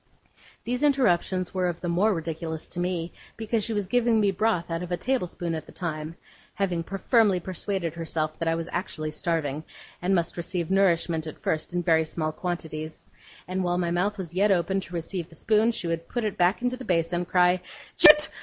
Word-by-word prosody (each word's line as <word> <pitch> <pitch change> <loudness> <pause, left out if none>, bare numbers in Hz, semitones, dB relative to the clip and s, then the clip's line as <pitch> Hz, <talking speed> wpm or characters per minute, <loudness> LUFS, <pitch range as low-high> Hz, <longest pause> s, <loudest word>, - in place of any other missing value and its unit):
These 245 +2 -2
interruptions 190 -10 +2
were 185 -1 +1
of 175 -1 -3
the 175 - -3
more 180 +6 +3
ridiculous 160 -2 -4
to 175 - -6
me, 175 -1 -2 0.2
because 220 -1 -1
she 230 - -2
was 205 -2 -1
giving 235 +2 +2
me 205 -2 +3
broth 185 -4 0
out 165 +1 -1
of 180 0 -6
a 175 - 0
table 255 -1 0
spoon 170 -1 -4
at 160 - -5
the - - -12
time 160 -2 -4 0.4
(having 180 -4 0
firmly 195 +1 +2
persuaded 185 -1 -3
herself 160 -2 -3
that 165 - -1
I 165 - +2
was 165 0 -4
actually 155 -4 -3
starving, 155 -2 -1 0.4
and 185 +2 +2
must 170 -1 -1
receive 170 0 -2
nourishment 170 -4 +2
at 155 - -7
first 155 +2 -2
in 175 0 -1
very 160 -1 +3
small 155 0 -2
quantities), 160 -2 -5 0.4
and, 185 +1 -1
while 175 0 0
my 175 -1 0
mouth 195 +5 0
was 175 -4 -6
yet 200 +3 +3
open 190 +1 +2
to 180 -1 -9
receive 170 +1 -4
the 165 - -16
spoon, 220 +6 +3
she 220 - -5
would 165 0 -2
put 240 - -2
it 210 -2 -1
back 180 +5 +2
into 250 0 0
the 260 - -8
basin, 175 -2 0
cry 180 0 +3 0.3
'Janet! 300 0 +8
175 Hz, 205 wpm, -26 LUFS, 165-195 Hz, 0.4 s, Janet